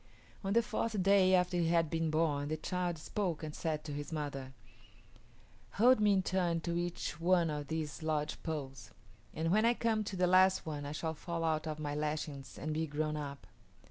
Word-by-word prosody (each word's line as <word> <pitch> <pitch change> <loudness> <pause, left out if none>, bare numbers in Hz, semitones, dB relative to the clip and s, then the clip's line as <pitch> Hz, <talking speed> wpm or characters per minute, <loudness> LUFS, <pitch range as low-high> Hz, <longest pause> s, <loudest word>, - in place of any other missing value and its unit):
On 195 0 0
the 235 +1 +4
fourth 220 -4 -1
day 190 -1 +5
after 180 0 +2
he 170 -1 +2
had 165 -2 +2
been 165 -1 0
born 155 -2 +1
the 155 +1 -2
child 180 +1 -2
spoke 170 0 -2
and 155 -1 -5
said 155 -1 -2
to 150 - -6
his 145 +3 -5
mother, 140 -4 -4 1.2
"Hold 245 +3 +5
me 210 -1 +4
in 190 -1 +2
turn 180 -3 +1
to 170 +1 -2
each 175 -3 -3
one 175 -2 +3
of 145 -1 -4
these 160 -2 -3
lodge 155 -1 -1
poles, 135 -6 -5 0.4
and 165 +2 -1
when 215 +3 +4
I 235 +1 +4
come 225 -2 +1
to 200 - -4
the 180 0 +2
last 185 +1 +5
one 145 -2 -4
I - - -4
shall 160 +1 -3
fall 165 +1 -4
out 160 -1 0
of 155 -1 -3
my 150 -1 -3
lashings 150 -2 -3
and 155 +1 -3
be 160 +1 -1
grown 155 +1 -1
up." 140 -2 -6
160 Hz, 205 wpm, -33 LUFS, 150-180 Hz, 1.2 s, day